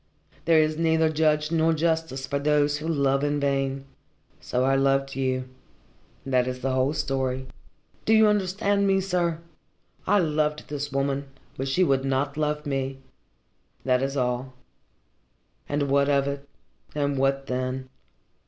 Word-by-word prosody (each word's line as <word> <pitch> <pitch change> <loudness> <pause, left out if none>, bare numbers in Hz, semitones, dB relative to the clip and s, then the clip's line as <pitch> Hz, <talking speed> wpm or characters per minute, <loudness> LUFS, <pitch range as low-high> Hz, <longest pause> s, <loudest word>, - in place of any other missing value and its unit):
There 165 -1 +5
is 155 0 +1
neither 160 -1 +3
judge 155 0 +1
nor 165 0 +3
justice 160 -4 -1
for 140 - -2
those 145 0 +2
who 155 - -5
love 140 -3 +1
in 145 0 0
vain. 135 -1 -1 0.5
So 125 - -1
I 135 +1 +3
loved 135 0 +1
you. 130 -1 -1 0.8
That 130 -2 +2
is 125 0 -4
the 135 +1 0
whole 130 +2 +1
story. 130 -2 -2 0.6
Do 220 - +4
you 220 0 +6
understand 200 0 +1
me, 195 0 +3
sir? 175 -3 0 0.7
I 205 - +4
loved 150 -3 0
this 145 0 -4
woman, 140 +1 -1 0.3
but 135 - -3
she 155 +8 +2
would 135 -5 +2
not 135 +1 -1
love 150 0 -1
me. 135 -1 -2 0.9
That 125 -1 +2
is 135 +1 -2
all. 125 0 -1 1.2
And 145 0 0
what 140 0 +2
of 140 -1 +2
it, 140 0 -5 0.5
and 145 -1 0
what 135 0 +1
then? 130 0 -3
140 Hz, 150 wpm, -25 LUFS, 135-155 Hz, 1.2 s, you